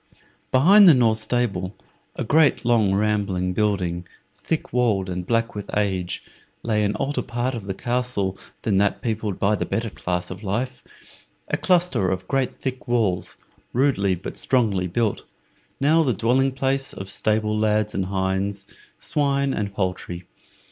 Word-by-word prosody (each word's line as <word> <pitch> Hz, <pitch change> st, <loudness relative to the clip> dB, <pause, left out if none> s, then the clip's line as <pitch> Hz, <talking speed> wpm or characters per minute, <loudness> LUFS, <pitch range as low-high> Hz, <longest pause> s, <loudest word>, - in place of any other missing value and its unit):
Behind 185 Hz, +9 st, +7 dB
the 155 Hz, -, +8 dB
north 115 Hz, -3 st, +3 dB
stable, 105 Hz, -6 st, -1 dB, 0.4 s
a -, -, -3 dB
great, 145 Hz, +1 st, +3 dB
long, 115 Hz, -5 st, +3 dB
rambling 100 Hz, -3 st, 0 dB
building, 90 Hz, -4 st, -1 dB, 0.3 s
thick 160 Hz, -, -3 dB
walled, 105 Hz, -7 st, +1 dB
and 90 Hz, 0 st, -4 dB
black 115 Hz, 0 st, +1 dB
with 105 Hz, -1 st, -7 dB
age, 95 Hz, -4 st, -1 dB, 0.4 s
lay 105 Hz, -2 st, +1 dB
an 105 Hz, 0 st, 0 dB
older 145 Hz, +1 st, -1 dB
part 120 Hz, +1 st, -2 dB
of 115 Hz, -5 st, -5 dB
the 95 Hz, -1 st, -4 dB
castle 120 Hz, -6 st, -1 dB, 0.3 s
than 100 Hz, -3 st, +1 dB
that 100 Hz, 0 st, +1 dB
peopled 110 Hz, -4 st, -2 dB
by 100 Hz, +2 st, +2 dB
the -, -, 0 dB
better 115 Hz, -1 st, -2 dB
class 90 Hz, -1 st, -3 dB
of 90 Hz, +2 st, -7 dB
life 125 Hz, +6 st, -3 dB, 0.7 s
a -, -, +1 dB
cluster 175 Hz, -, +2 dB
of 95 Hz, 0 st, -3 dB
great 135 Hz, -2 st, 0 dB
thick 130 Hz, -1 st, -5 dB
walls, 110 Hz, -7 st, 0 dB, 0.4 s
rudely 115 Hz, -8 st, +2 dB
but 90 Hz, -, -8 dB
strongly 105 Hz, -8 st, +1 dB
built, 110 Hz, +4 st, -1 dB, 0.5 s
now 155 Hz, +4 st, +4 dB
the 135 Hz, -6 st, +2 dB
dwelling 130 Hz, +6 st, +2 dB
place 135 Hz, +1 st, 0 dB
of 95 Hz, -, -7 dB
stable 105 Hz, +2 st, 0 dB
lads 105 Hz, 0 st, +1 dB
and 95 Hz, -1 st, -1 dB
hinds, 95 Hz, +1 st, -1 dB, 0.3 s
swine 140 Hz, -2 st, 0 dB
and 100 Hz, -1 st, -2 dB
poultry. 90 Hz, -2 st, -3 dB
105 Hz, 155 wpm, -23 LUFS, 95-125 Hz, 0.7 s, the